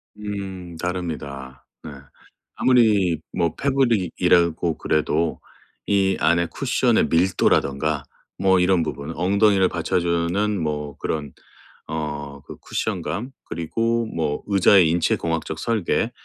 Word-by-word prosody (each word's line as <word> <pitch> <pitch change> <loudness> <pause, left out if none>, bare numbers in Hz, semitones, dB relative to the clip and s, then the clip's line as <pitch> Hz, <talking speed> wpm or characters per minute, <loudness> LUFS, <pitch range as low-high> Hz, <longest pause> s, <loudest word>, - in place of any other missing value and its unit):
음 95 -4 -6
다릅니다. 75 -8 -5 0.2
네. 80 - -8 0.6
아무리 105 -10 +3
뭐 85 -3 0
패브릭이라고 90 - +1
그래도 80 +1 0 0.5
이 95 -2 +2
안에 85 +2 +2
쿠션의 - - +1
밀도라든가 80 -4 +1 0.4
뭐 95 -1 +4
이런 90 -1 +3
부분, 75 0 -5
엉덩이를 95 +1 +3
받쳐주는 85 +4 0
뭐 75 -2 -3
그런 75 -3 -4 0.5
어 75 -2 -5
그 - - -9
쿠션감 120 +6 -3
그리고 115 +8 -1
뭐 80 -8 -2
의자의 95 -3 +5
인체 85 +1 +2
공학적 80 -1 -3
설계 115 +2 0
85 Hz, 240 characters per minute, -22 LUFS, 80-100 Hz, 0.6 s, 의자의